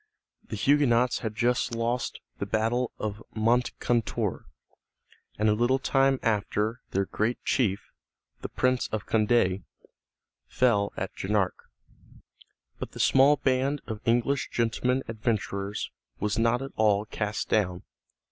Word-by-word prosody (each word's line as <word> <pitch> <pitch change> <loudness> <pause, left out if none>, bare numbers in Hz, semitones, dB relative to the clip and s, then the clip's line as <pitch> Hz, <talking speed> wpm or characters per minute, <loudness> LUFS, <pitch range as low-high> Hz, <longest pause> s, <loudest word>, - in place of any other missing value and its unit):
The - - -5
Huguenots 125 -4 +3
had 110 -2 -4
just 120 +1 +1
lost 120 +2 -2 0.2
the 100 - -3
battle 115 +4 0
of 105 0 -4
Moncontour, 120 0 0 0.9
and 110 - +2
a 105 - +4
little 120 +4 +2
time 135 0 +2
after 110 +1 0
their 95 +1 0
great 110 +5 -1
chief, 100 -7 0 0.5
the - - -5
Prince 125 -1 +1
of 110 -1 -4
Condé, 105 -4 +2 0.9
fell 105 -5 +2
at 95 - -4
Jarnac. 100 -1 +1 1.3
But - - -6
the - - -9
small 135 +2 +5
band 135 +1 +1
of 110 -2 -6
English 120 +4 +1
gentlemen 125 +3 0
adventurers 105 -3 -2 0.3
was 105 +1 -1
not 115 +3 +2
at 135 - -7
all 105 -1 +3
cast 105 -1 -3
down. 90 -4 +1
115 Hz, 125 wpm, -27 LUFS, 105-125 Hz, 1.3 s, small